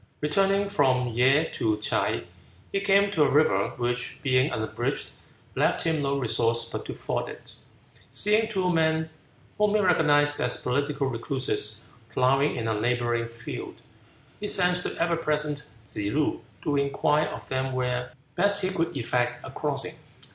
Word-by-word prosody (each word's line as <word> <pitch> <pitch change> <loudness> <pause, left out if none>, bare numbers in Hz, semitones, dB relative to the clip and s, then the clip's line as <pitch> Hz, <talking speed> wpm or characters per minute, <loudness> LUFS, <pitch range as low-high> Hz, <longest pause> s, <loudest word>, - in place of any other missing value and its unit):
Returning 195 +6 +2
from 130 -9 +2
Ye 130 +7 +3
to 110 -2 0
Ts'ae, 105 - 0 0.5
he 195 - +1
came 200 0 +4
to 170 -6 0
a 145 - +5
river 130 -9 +3
which, 120 0 -2
being 130 0 +3
unbridged, 110 -6 -3 0.4
left - - +1
him 160 -2 0
no 140 0 0
resource 115 -2 +1
but - - -6
to - - -6
ford - - -3
it. - - -9 0.6
Seeing 215 +2 +2
two 185 -4 0
men 160 0 +1 0.5
whom 210 0 +3
he - - +4
recognized 145 -6 +3
as 125 - 0
political 140 +2 -1
recluses 120 -3 -1 0.2
ploughing 135 +5 +2
in 115 -2 -3
a 110 - +1
neighboring 120 0 0
field, 115 0 -7 0.6
he 210 - -3
sent 180 -2 +3
the - - -5
ever 170 0 +1
present 150 -1 -1 0.2
Tsze 100 +1 -3
loo 150 +1 0 0.2
to 145 -2 0
inquire 145 +2 +2
of - - -8
them 130 0 -2
where 125 -1 -2 0.2
best 200 +5 +3
he 185 - +1
could 165 -5 -1
effect 120 0 0
a - - -7
crossing. - - -2
140 Hz, 155 wpm, -26 LUFS, 125-165 Hz, 0.6 s, a